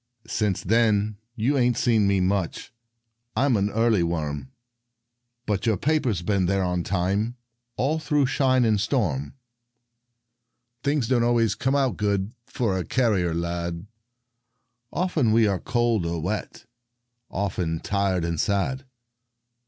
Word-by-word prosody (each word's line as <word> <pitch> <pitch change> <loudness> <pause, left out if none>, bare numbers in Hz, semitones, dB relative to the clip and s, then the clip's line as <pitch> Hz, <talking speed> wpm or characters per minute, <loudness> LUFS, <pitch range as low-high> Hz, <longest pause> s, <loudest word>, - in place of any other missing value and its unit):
Since 105 -4 -1
then 110 0 +2 0.2
you 120 +6 +1
ain't 120 -1 +2
seen 115 -4 +3
me 100 -1 +2
much; 95 - -1 0.6
I'm 135 -2 +3
an 100 0 +1
early 115 -2 +2
worm. 80 - -2 0.9
But 105 0 -1
your 110 -3 +2
paper's 130 - 0
been 95 -2 +1
on 90 -2 0
time 100 +7 -1 0.4
All 150 +5 +1
through 150 -2 +1
shine 130 -1 +2
and 105 -3 +2
storm. 85 - -1 1.5
Things 140 -2 0
don't 125 -1 +2
always 115 -3 +2
come 130 +6 0
too 135 -7 +1
good 100 -1 -1 0.2
For 100 -6 -1
a - - -2
carrier 95 -10 +1
lad. 85 +1 -3 1.1
Often 165 -11 +1
we 115 0 +5
are 100 -3 +1
cold 120 -5 +1
or 85 0 -2
wet, 100 +8 -4 0.6
Often 90 -4 -2
tired 100 -4 0
and 85 -2 -2
sad. 130 +7 0
105 Hz, 130 wpm, -25 LUFS, 90-120 Hz, 1.5 s, we